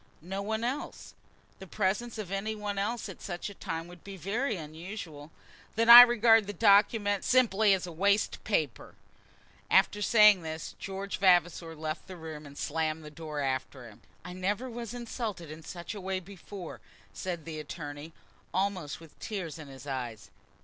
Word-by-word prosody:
"No 195 +3 -4
one 220 +2 -2
else. 260 +5 -4 0.5
The 190 - -10
presence 210 +6 -1
of 205 -4 -6
any 205 +3 -2
one 205 -1 -3
else 225 +4 -2
at 195 - -10
such 180 +2 -5
a - - -10
time 165 -3 -5
would 175 -1 -14
be 195 -1 -9
very 220 - -1
unusual." 160 -1 -8 0.5
"Then 230 +1 +2
I 240 +1 +15
regard 230 -3 +5
the 205 - -4
document 205 0 +4
simply 220 -5 +4
as 180 -1 -5
waste 200 +5 +1
paper." 155 - -2 0.7
After 205 - +4
saying 210 -3 +6
this, 160 0 -6
George 195 0 -5
Vavasor 175 -3 +3
left 155 +1 -5
the 185 -2 -9
room, 155 -2 -8
and 140 0 -13
slammed 155 0 -2
the 150 - -9
door 150 -1 -5
after 130 -2 -3
him. 110 -2 -16 0.2
"I 180 - -7
never 200 +7 -2
was 235 0 -6
insulted 225 - -5
in 155 +1 -9
such 170 +4 -7
a 205 - -7
way 190 0 -2
before," 190 -1 -10 0.3
said 175 -4 -5
the 160 -2 -6
attorney, 150 0 -7 0.4
almost 185 -6 -1
with 165 -2 -16
tears 180 -7 -5
in 150 - -9
his 135 -1 -11
eyes. 120 -7 -5
185 Hz, 170 wpm, -30 LUFS, 160-210 Hz, 0.7 s, I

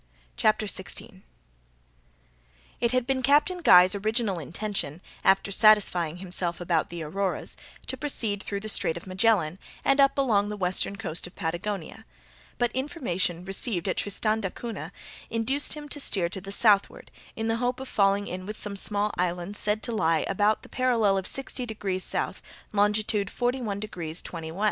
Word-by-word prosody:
CHAPTER 215 0 +2
16 190 -1 -3 1.6
It 235 - +2
had 255 -1 +1
been 265 0 0
Captain 295 +7 +3
Guy's 185 - +7
original 215 -2 0
intention, 175 -3 -4 0.2
after 195 +1 +3
satisfying 190 -6 +4
himself 180 -1 -1
about 175 -2 0
the 170 -1 -5
Auroras, 190 +4 -1 0.3
to - - -3
proceed 225 -9 0
through 200 -1 -4
the 215 - -6
Strait 170 -5 +2
of 170 - -9
Magellan, 185 -3 +1 0.3
and 275 +1 +3
up 275 0 +5
along 210 -7 +2
the 210 - -4
western 185 +1 0
coast 180 -5 -3
of 180 - -15
Patagonia; 180 +5 -4 0.5
but 240 -1 +1
information 190 - -2
received 195 -1 -2
at 185 - -1
Tristan 215 +2 0
d'Acunha 195 -4 -5 0.4
induced 245 +6 +1
him 300 -1 -8
to 290 - -1
steer 185 -10 +2
to 190 +1 -6
the 195 +1 -8
southward, 200 -1 +2 0.2
in 225 0 -2
the 225 0 +1
hope 245 +1 -1
of 265 - -6
falling 200 -2 +2
in 185 0 -6
with 215 - -6
some 205 -1 -4
small 205 +1 0
islands 180 +2 -2
said 210 +1 0
to 240 - -3
lie 165 -7 +1
about 210 +2 +1
the - - -12
parallel 235 -6 +2
of 190 0 -1
60 270 -1 -3
degrees 195 -4 -3
S., - - -2 0.3
longitude 210 0 +1
41 245 -4 -1
degrees 175 -6 -5
20' 165 -2 -6
W. 165 +4 -7
205 Hz, 165 wpm, -27 LUFS, 180-225 Hz, 1.6 s, Guy's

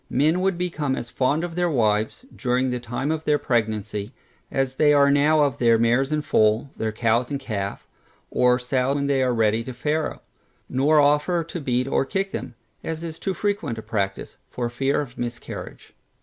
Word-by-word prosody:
Men 155 +7 +2
would 190 -2 +1
become 155 -6 -1
as 120 - -6
fond 145 +5 +1
of 175 -1 -4
their 175 0 +1
wives, 110 - 0
during 125 0 0
the 125 - -2
time 125 +5 -3
of 160 0 -2
their 150 -1 +2
pregnancy, 110 -3 -1 0.4
as 135 -1 -1
they 150 -1 +5
are 140 0 +5
now 150 +2 +4
of 140 -4 0
their 115 -2 +5
mares 120 +5 +2
in 150 -1 0
foal, 110 +4 +2
their 110 0 -2
cows 115 +2 +1
in 145 - -1
calf, 105 -7 -4 0.4
or 125 0 +4
sows 125 +2 0
when 140 -1 0
they 140 -1 +2
are 130 -1 +2
ready 110 -1 +2
to 130 - -7
farrow; 150 +5 -2 0.4
nor 145 +4 +3
offer 150 +4 +3
to 165 +1 -6
beat 125 -1 0
or 135 - +2
kick 195 +8 -2
them 120 +1 -5 0.3
(as 160 0 -4
is 165 -1 -6
too 190 -1 -2
frequent 205 - -2
a 110 - -6
practice) 100 -2 -3
for 120 -1 -3
fear 135 +4 0
of 125 -4 -9
a - - -2
miscarriage. 120 -1 -7
130 Hz, 195 wpm, -24 LUFS, 120-150 Hz, 0.4 s, they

